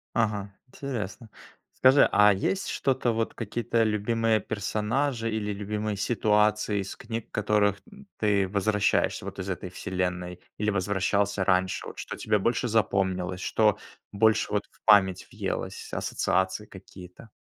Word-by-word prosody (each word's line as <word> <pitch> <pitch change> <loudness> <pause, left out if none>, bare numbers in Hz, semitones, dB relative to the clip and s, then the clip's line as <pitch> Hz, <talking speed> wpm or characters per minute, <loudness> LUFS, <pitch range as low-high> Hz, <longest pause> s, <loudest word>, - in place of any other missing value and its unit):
Ага, 105 -3 0
интересно. 120 -5 -6 0.5
Скажи, 130 +2 +6
а 105 0 +6
есть 190 - -1
что-то 130 -3 0
вот, 115 0 -1
какие-то 115 +1 -1
любимые 110 +1 +1
персонажи 115 +5 -1
или 110 -1 -2
любимые 105 +1 -3
ситуации 105 -1 +2
из 95 - -6
книг, 115 -2 -6
к - - -50
которым 105 -1 +2 0.4
ты 100 -3 +2
возвращаешься 105 +1 +1
вот - - -7
из 95 0 -5
"Этой 90 -1 -4
вселенной", 90 -1 -3 0.2
или 105 0 +1
возвращался 100 0 0
раньше? 95 0 +1
Вот - - -9
что - - -6
тебе 105 -1 +1
больше 115 +4 0
запомнилось, 95 -4 0
что 105 -1 +2 0.3
больше 110 +1 +2
вот 105 -1 0
в - - -29
память 95 -3 +4
въелось, - - -4
ассоциации 95 +3 -1
какие-то? 95 +2 -13
105 Hz, 135 wpm, -27 LUFS, 95-110 Hz, 0.5 s, Скажи